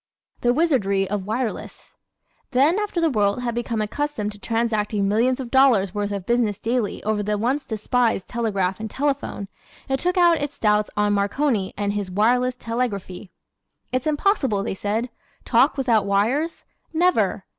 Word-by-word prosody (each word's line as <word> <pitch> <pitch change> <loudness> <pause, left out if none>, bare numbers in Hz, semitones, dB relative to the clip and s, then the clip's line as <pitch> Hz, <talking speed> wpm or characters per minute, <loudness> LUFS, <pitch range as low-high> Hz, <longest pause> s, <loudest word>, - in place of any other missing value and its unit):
The 240 - +2
Wizardry 240 - +1
of 200 -1 -3
Wireless 230 +2 -4 0.5
¶ - - -57
Then 290 +10 +4
after 415 -4 -2
the 330 -2 +2
world 205 0 +1
had 235 -1 -1
become 235 -2 -2
accustomed 225 -2 -3
to 205 - -12
transacting 215 -2 0
millions 235 +6 +2
of 250 -3 -6
dollars 245 -9 +4
worth 205 -1 -2
of 200 -3 -4
business 235 -3 +1
daily 230 -1 -1
over 215 0 0
the 210 0 -1
once 260 +6 -1
despised 225 -1 0
telegraph 200 -5 -1
and 220 0 -5
telephone 270 -6 -2 0.4
it 270 0 0
took 360 +4 0
out 345 -3 +4
its 290 0 -4
doubts 210 -1 +2
on 210 0 +2
Marconi 205 +1 0
and 205 0 -1
his 205 -2 -3
"wireless 245 +6 +2
telegraphy." 220 -6 -4 0.6
"It's 255 +3 -1
impossible," 290 - +1
they 220 - -2
said. 215 +5 -2 0.4
"Talk 265 +5 +3
without 230 -6 +2
wires? 240 +12 0 0.3
Never!" 315 - +1
230 Hz, 160 wpm, -23 LUFS, 205-265 Hz, 0.6 s, Then